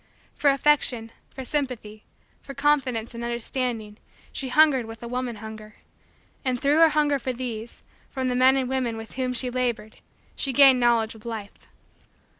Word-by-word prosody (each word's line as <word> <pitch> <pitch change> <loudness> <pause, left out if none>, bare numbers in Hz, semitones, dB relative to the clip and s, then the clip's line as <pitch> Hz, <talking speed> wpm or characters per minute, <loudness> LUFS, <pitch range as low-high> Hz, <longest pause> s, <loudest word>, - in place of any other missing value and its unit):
For 290 - +2
affection, 275 -5 +2 0.2
for 265 - -8
sympathy, 245 -7 -4 0.4
for 275 - -10
confidence, 270 -6 0
and 235 0 -6
understanding, 235 -2 -3 0.3
she 265 - -4
hungered 275 -4 +4
with 225 0 -10
a - - -5
woman 250 -1 -3
hunger; 215 0 -10 0.7
and, 255 -3 -1
through 290 +4 +2
her 330 -1 +7
hunger 295 -2 +1
for 255 0 -3
these, 235 -2 -6 0.3
from 260 -2 -3
the 250 - 0
men 260 +2 +5
and 260 -1 0
women 250 -3 -1
with 225 0 -9
whom 255 -1 -2
she 250 0 +1
labored 240 -4 -2 0.4
she 270 - -1
gained 270 -1 +7
Knowledge 235 -2 +2
of 220 -1 -15
Life. 220 -4 -8
250 Hz, 165 wpm, -25 LUFS, 225-270 Hz, 0.7 s, her